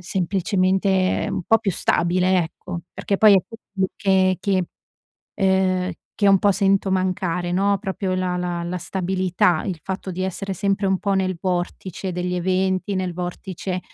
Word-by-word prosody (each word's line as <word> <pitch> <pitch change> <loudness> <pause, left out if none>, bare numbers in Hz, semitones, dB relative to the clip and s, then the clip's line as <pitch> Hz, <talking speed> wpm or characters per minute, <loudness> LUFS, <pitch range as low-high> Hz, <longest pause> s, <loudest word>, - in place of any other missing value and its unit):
semplicemente 190 +1 +1
un 190 -1 -2
po' 225 +4 +4
più 195 - -1
stabile, 180 +1 +2
ecco. 170 +1 -7
Perché 200 - -2
poi 210 -1 +7
è - - +7 0.6
che 190 -2 +3
che, 190 -3 +1 0.7
ehm, 190 -1 +1 0.2
che 205 - +2
un 195 -1 +7
po' 205 - +4
sento 195 0 +2
mancare 180 -2 -1
no, 200 +2 +2
proprio 190 -2 -3
la 180 -1 -1
la 175 -1 -2
la 180 +1 -3
stabilità, 180 -1 0
il 180 -5 -3
fatto 190 0 -5
di 185 +1 -4
essere 190 +1 -3
sempre 195 +1 0
un 190 -1 +1
po' 200 -2 0
nel 185 -1 0
vortice 185 0 -3
degli 180 +1 -2
eventi, 185 +2 0
nel 185 -2 -2
vortice 180 +1 -4
185 Hz, 155 wpm, -22 LUFS, 180-195 Hz, 0.7 s, poi